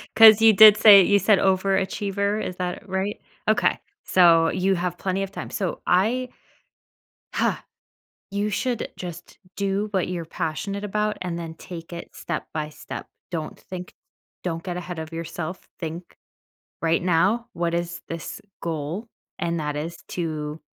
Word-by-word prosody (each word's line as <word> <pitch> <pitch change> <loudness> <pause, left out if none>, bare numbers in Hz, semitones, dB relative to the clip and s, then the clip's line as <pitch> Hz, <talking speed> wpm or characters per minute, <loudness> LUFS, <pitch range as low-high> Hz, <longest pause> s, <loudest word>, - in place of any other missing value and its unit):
'cause 220 -1 +9
you 225 -1 +8
did 215 0 +9
say 200 -3 +9
you 200 +2 +4
said 200 -1 +4
overachiever, 195 +2 +1
is 180 - -4
that 180 +1 -4
right? 190 +2 -2 0.3
Okay. 215 +2 +3 0.2
So, 165 -3 +5
you 190 +2 +1
have 180 -1 -2
plenty 190 +1 -1
of 195 0 -3
time. - - -7
So, 190 -5 -3
I 235 +8 +2 1.1
Ha! - - 0 0.7
You 205 +1 -1
should 235 +4 -2
just 175 -1 -8 0.2
do 200 +1 -1
what 190 -3 0
you're 175 -2 -3
passionate 185 +5 -3
about, 210 +1 -1
and 175 -2 -3
then 165 -1 -6
take 170 0 -9
it 170 - -9
step 170 - -4
by 150 -1 -2
step. 155 - -8 0.2
Don't 160 -3 -4
think 180 -1 -8 0.5
don't 165 -2 -3
get 180 -2 -4
ahead 180 -1 -6
of 160 0 -6
yourself. 165 +2 -6
Think 165 +1 -6 0.7
right 165 0 +2
now, 185 +7 +2
"What 170 0 -1
is 170 0 -2
this 165 -1 -6 0.2
goal?" 165 +7 -4 0.3
And 170 -2 -1
that 150 -1 -2
is 165 +3 -4
to, 155 -3 -3
180 Hz, 155 wpm, -24 LUFS, 165-200 Hz, 1.1 s, cause